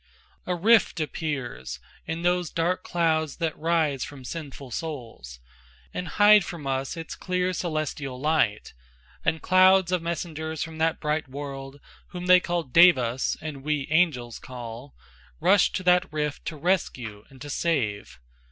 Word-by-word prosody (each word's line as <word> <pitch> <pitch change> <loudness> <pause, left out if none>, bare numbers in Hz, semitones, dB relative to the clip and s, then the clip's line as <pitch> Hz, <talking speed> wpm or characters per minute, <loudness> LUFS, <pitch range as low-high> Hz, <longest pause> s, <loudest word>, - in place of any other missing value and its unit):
A 180 - 0
rift 220 +2 +4
appears 135 - -4 0.3
In 165 +1 -3
those 175 -1 +1
dark 180 +3 -1
clouds 160 -3 0
that 165 -3 -1
rise 155 -5 +1
from 140 -2 -9
sinful 140 -4 -7
souls 115 - -6 0.5
And 180 - -4
hide 205 +1 +6
from 170 -5 -7
us 135 +3 -2
its 165 0 -6
clear 180 0 -1
celestial 155 -6 -3
light, 150 -8 +1 0.5
And 160 - 0
clouds 185 0 +5
of 180 -2 +1
messengers 160 -2 -3
from 160 -1 -8
that 160 0 +1
bright 150 0 -1
world, 135 0 -7 0.3
Whom 180 0 -7
they 180 0 +7
called 175 -7 -3
devas 130 -8 +5
and 150 -3 -6
we 150 -1 -1
angels 140 -9 +1
call, 120 +1 -9 0.4
Rush 200 -1 +4
to 185 - -2
that 180 -1 +3
rift 150 -1 -3
to 160 - -4
rescue 125 - -1
and 135 - -16
to 145 +2 -7
save. 120 - -1
155 Hz, 145 wpm, -26 LUFS, 135-175 Hz, 0.5 s, they